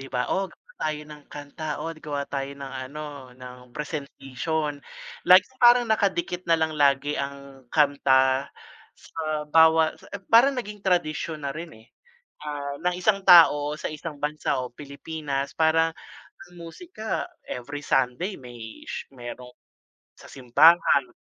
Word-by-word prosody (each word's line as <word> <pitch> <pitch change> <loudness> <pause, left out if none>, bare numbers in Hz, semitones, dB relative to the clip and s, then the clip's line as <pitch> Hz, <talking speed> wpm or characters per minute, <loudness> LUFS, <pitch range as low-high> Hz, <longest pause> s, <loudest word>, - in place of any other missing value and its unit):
di 135 - -9
ba? 125 -1 -1
"Oh, 195 0 -1
gawa - - -22
tayo 155 -1 -2
ng 150 -1 -13
kanta," 145 +2 -8
"Oh, 165 - -4
gawa 145 -3 -5
tayo 135 -1 -4
ng 135 -1 -8 0.2
ano, 145 -3 -8
ng 125 0 -10 0.2
presentation." 150 0 -4 0.5
Laging 185 +8 +6
parang 240 0 +7
nakadikit 195 -5 0
na 165 - +5
lang 160 -1 0
lagi 145 0 +2
ang 140 -2 -8
kanta, 135 -2 +3 0.5
sa 155 -2 -4
bawa 160 +1 +5
sa - - -16 0.2
parang 260 +4 +6
naging 210 -3 -6
tradisyon 160 -5 -1
na 140 - -2
rin, 165 +4 -7
eh, 110 - -19 0.6
ah, 145 -1 -5
ng 180 +4 -1
isang 195 +1 +1
tao 150 -4 +6
sa - - -3
isang 155 -1 -7
bansa 150 -2 -1
o 125 - -3
Pilipinas, 140 +1 -5
parang 160 0 +2 0.5
ang 175 - -19
musika, 220 - -5 0.2
every 140 +4 -6
Sunday 140 +7 0
may 120 -3 -11
sh - - -6
merong 125 0 -9 0.6
sa - - -16
simbahan. 140 0 +4
150 Hz, 140 wpm, -25 LUFS, 140-165 Hz, 0.6 s, parang